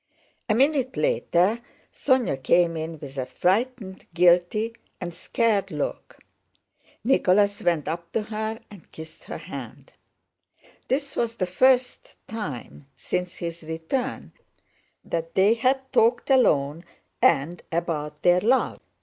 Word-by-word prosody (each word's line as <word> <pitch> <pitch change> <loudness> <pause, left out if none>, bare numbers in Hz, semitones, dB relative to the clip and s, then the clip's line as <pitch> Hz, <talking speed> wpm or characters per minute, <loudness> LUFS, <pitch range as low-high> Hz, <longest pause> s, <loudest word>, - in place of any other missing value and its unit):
A 215 - +3
minute 270 0 +2
later 220 - +2 0.3
Sónya 245 - +1
came 170 +5 +3
in 160 0 -4
with 140 -2 -8
a 130 - -3
frightened, 205 0 -1
guilty, 180 +6 +3 0.3
and 175 -1 -5
scared 210 +3 0
look. - - -4 0.9
Nicholas 205 -4 +3
went 165 -4 +1
up 170 +1 -4
to 220 - 0
her 220 +1 -4
and 200 -5 -15
kissed 160 0 -11
her - - -6
hand. - - -9 0.9
This 275 +1 -1
was 230 -1 -1
the 185 - -1
first 250 +7 +2
time 145 - -7
since 180 0 -3
his 170 -1 -6
return 160 +11 -4 0.7
that 165 0 -4
they 195 +3 +5
had 265 +2 0
talked 240 +4 +3
alone 155 - +3 0.4
and 160 +5 +3
about 150 -3 -3
their 175 0 +5
love. 255 +6 +2
185 Hz, 125 wpm, -25 LUFS, 165-235 Hz, 0.9 s, they